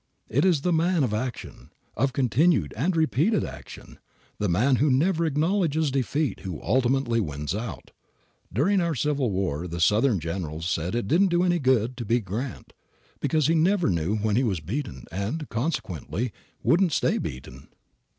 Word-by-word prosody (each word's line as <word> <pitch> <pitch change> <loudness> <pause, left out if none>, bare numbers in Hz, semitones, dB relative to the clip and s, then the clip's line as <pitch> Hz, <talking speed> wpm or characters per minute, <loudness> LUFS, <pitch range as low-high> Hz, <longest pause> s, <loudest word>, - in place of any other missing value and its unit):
It 140 - +2
is 170 -7 +3
the 180 +3 +1
man 165 0 +2
of 115 -5 0
action, 120 +3 -5 0.3
of 135 0 +1
continued 130 - +2
and 165 +10 0
repeated 160 - +2
action, - - -10 0.4
the 105 - 0
man 125 +10 +3
who 145 +4 +3
never 165 +5 +2
acknowledges 160 -1 +1
defeat 140 +2 -1
who 90 -6 -6
ultimately 130 -2 +1
wins 75 -6 -3
out. 115 +3 -6 0.6
During 180 - +2
our 170 -2 0
Civil 140 -2 0
War 90 -4 -2
the 85 0 -5
Southern 105 +5 +3
generals 80 -1 -4
said 85 +4 -1
it 120 -5 -1
didn't 185 - +4
do 175 0 +2
any 175 -1 +2
good 130 -3 +2
to 120 - -4
beat 115 0 +1
Grant, 115 +8 -5 0.5
because 155 -3 +1
he 160 - +3
never 170 - +2
knew 85 +4 0
when 105 -1 0
he 130 - +3
was 100 -8 0
beaten 95 - -5
and, 105 - -3
consequently, 110 - -3 0.3
wouldn't 175 -1 +3
stay - - +1
beaten. 65 +1 -7
130 Hz, 165 wpm, -25 LUFS, 100-160 Hz, 0.6 s, didn't